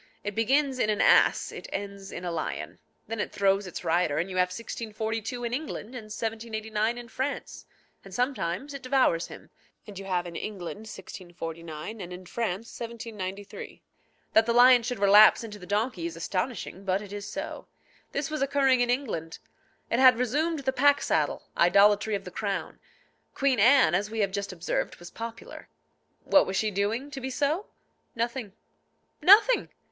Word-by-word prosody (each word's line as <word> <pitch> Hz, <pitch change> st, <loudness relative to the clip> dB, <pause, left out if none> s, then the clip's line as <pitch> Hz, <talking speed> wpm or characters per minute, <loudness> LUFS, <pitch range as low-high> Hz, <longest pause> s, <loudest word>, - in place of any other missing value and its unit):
It 205 Hz, -, -3 dB
begins 265 Hz, +4 st, +1 dB
in 215 Hz, -, +2 dB
an 210 Hz, -1 st, 0 dB
ass; -, -, +4 dB
it -, -, -8 dB
ends 200 Hz, -1 st, -6 dB
in 175 Hz, -, -6 dB
a 175 Hz, -, -2 dB
lion. 165 Hz, -2 st, -4 dB, 0.3 s
Then 225 Hz, 0 st, -5 dB
it -, -, -2 dB
throws 195 Hz, 0 st, +2 dB
its 180 Hz, -, -7 dB
rider, 165 Hz, -3 st, +1 dB
and 175 Hz, +4 st, -1 dB
you 185 Hz, -, -4 dB
have 180 Hz, 0 st, +4 dB
1642 225 Hz, +3 st, -4 dB
in 235 Hz, 0 st, -2 dB
England 275 Hz, -5 st, -4 dB
and 245 Hz, -3 st, -8 dB
1789 220 Hz, 0 st, -2 dB
in 240 Hz, -1 st, -8 dB
France; 265 Hz, +4 st, -4 dB, 0.4 s
and 195 Hz, -, -13 dB
sometimes 250 Hz, +1 st, -2 dB
it 275 Hz, -, -7 dB
devours 255 Hz, -11 st, +2 dB
him, -, -, -12 dB, 0.3 s
and 205 Hz, -3 st, -9 dB
you 195 Hz, -, -8 dB
have 180 Hz, -2 st, -1 dB
in 170 Hz, -1 st, -8 dB
England 200 Hz, -1 st, -5 dB
1649, 170 Hz, 0 st, -8 dB
and 180 Hz, -1 st, -7 dB
in 180 Hz, +1 st, -9 dB
France 225 Hz, +1 st, -4 dB
1793. 215 Hz, -4 st, -7 dB, 0.5 s
That 220 Hz, +1 st, +5 dB
the 235 Hz, -, +2 dB
lion 245 Hz, +1 st, +7 dB
should 245 Hz, +1 st, -3 dB
relapse 205 Hz, +3 st, +7 dB
into 210 Hz, -2 st, -8 dB
the 180 Hz, -, -11 dB
donkey 205 Hz, -4 st, -1 dB
is 170 Hz, -, -7 dB
astonishing; 190 Hz, +3 st, -3 dB
but 195 Hz, +1 st, 0 dB
it 205 Hz, -1 st, -10 dB
is 205 Hz, 0 st, -6 dB
so. -, -, -6 dB, 0.4 s
This 280 Hz, +2 st, -2 dB
was 305 Hz, -, -3 dB
occurring 270 Hz, -2 st, +3 dB
in 245 Hz, -, +1 dB
England. 215 Hz, -, -2 dB, 0.5 s
It 235 Hz, -, +2 dB
had 255 Hz, -2 st, +7 dB
resumed 290 Hz, +6 st, 0 dB
the 265 Hz, -1 st, -1 dB
pack 285 Hz, +2 st, +4 dB
saddle, -, -, 0 dB
idolatry 205 Hz, +4 st, +4 dB
of 195 Hz, -, -4 dB
the 180 Hz, -, -9 dB
crown. 195 Hz, -5 st, -3 dB, 0.6 s
Queen 270 Hz, -4 st, +2 dB
Anne, 250 Hz, -, +6 dB
as 200 Hz, +4 st, +1 dB
we 220 Hz, 0 st, -2 dB
have 200 Hz, -1 st, +1 dB
just 200 Hz, 0 st, -3 dB
observed, 175 Hz, -1 st, -2 dB
was 175 Hz, 0 st, -12 dB
popular. 230 Hz, 0 st, -8 dB, 0.5 s
What 290 Hz, -, +4 dB
was 190 Hz, -, -3 dB
she 215 Hz, -1 st, +1 dB
doing 215 Hz, +8 st, -1 dB
to 275 Hz, -2 st, -6 dB
be 260 Hz, -, -3 dB
so? 300 Hz, +9 st, -1 dB, 0.5 s
Nothing. 235 Hz, -3 st, -3 dB, 0.7 s
Nothing! 435 Hz, +6 st, +6 dB
215 Hz, 175 wpm, -27 LUFS, 190-250 Hz, 0.7 s, lion